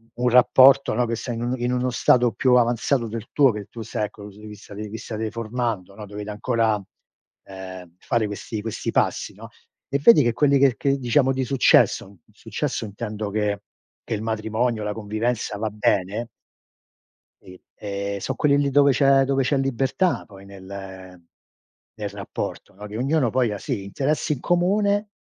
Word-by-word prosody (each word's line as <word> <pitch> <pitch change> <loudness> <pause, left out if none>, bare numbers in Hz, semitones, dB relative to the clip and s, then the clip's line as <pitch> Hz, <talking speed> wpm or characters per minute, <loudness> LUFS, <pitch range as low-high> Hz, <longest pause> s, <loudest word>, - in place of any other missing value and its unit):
un 125 +1 +1
rapporto, 130 +2 +6
no, 120 +2 +1
che 115 0 -2
sei 120 +1 -5
in 115 - -5
un 120 +1 -1
in 120 +1 -1
uno 125 0 0
stato 120 -1 +3
più 125 +5 +2
avanzato 120 +1 +2
del 115 0 -6
tuo, 140 -3 +4
che 105 -2 -6
tu 115 - -9
sei, 105 0 -3
ecco, 105 0 -11
se 105 +2 -14
vistate 105 0 -9
vi 105 +2 -7
state 110 -1 -4
formando, 115 -4 -3
no, 105 - -8
dovete 105 +1 -7
ancora, 110 -1 0 0.6
ehm, 95 -2 -10
fare 115 -3 0
questi 105 +1 -5
questi 110 0 -4
passi, - - 0
no, - - -11 0.4
e 140 +1 0
vedi 150 - +7
che 120 - +1
quelli 140 +3 +3
che 135 -3 +4
che 140 0 +1
diciamo, 135 +1 +2
di 130 0 -1
successo, 115 -6 +3
successo - - -4
intendo 105 0 -5
che 105 -1 -1 0.4
che - - -4
il 105 - -2
matrimonio, 110 +1 -1
la 105 0 -2
convivenza 110 +1 -2
va 110 +1 -2
bene 105 +2 0 1.1
sì, 90 0 -14 0.2
ehm, 100 -1 -4
son 130 +6 -3
quelli 145 0 +2
dove 140 0 +5
c'è 135 0 +4
dove 135 0 +1
c'è 140 +2 +1
libertà 135 +7 0
poi 100 -2 -14
nel 95 -2 -10 0.8
nel 105 -2 -4
rapporto, 100 -2 -6
no, 105 +2 -10
che 105 +1 -7
ognuno 135 0 +1
poi 125 -3 +1
ha, 105 - -4
sì, 105 -4 -4
interessi 140 +9 -1
in 140 - -7
comune, 200 +4 +1
115 Hz, 175 wpm, -23 LUFS, 105-130 Hz, 1.1 s, vedi